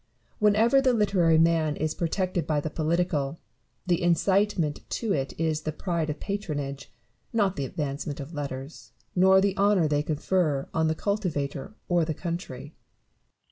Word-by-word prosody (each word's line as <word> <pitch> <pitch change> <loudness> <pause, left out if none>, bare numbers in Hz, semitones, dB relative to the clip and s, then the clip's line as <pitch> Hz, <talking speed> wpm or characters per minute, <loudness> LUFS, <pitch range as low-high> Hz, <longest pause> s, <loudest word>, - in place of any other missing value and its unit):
Whenever 220 +5 +4
the 260 -2 +3
literary 185 -7 +3
man 160 -2 +3
is 155 +1 -1
protected 180 +1 -1
by 150 -2 +1
the 150 +1 -4
political, 160 -3 0 0.5
the 175 -2 +1
incitement 175 -2 +2
to 220 -4 -1
it 135 0 -3
is 160 -1 0
the 155 - -3
pride 165 0 -2
of 150 - -4
patronage; 145 -9 -4 0.4
not 200 -5 +1
the 140 - -2
advancement 145 +1 -4
of 145 +4 -7
letters, 140 0 -6 0.2
nor 190 +1 +6
the 195 0 +1
honour 200 -4 +3
they 145 -1 +1
confer 150 -1 0
on 160 0 +2
the 160 - +1
cultivator 160 -6 -2
or 175 -1 +2
the 160 -1 -2
country. 165 -5 -5
165 Hz, 150 wpm, -27 LUFS, 150-190 Hz, 0.5 s, nor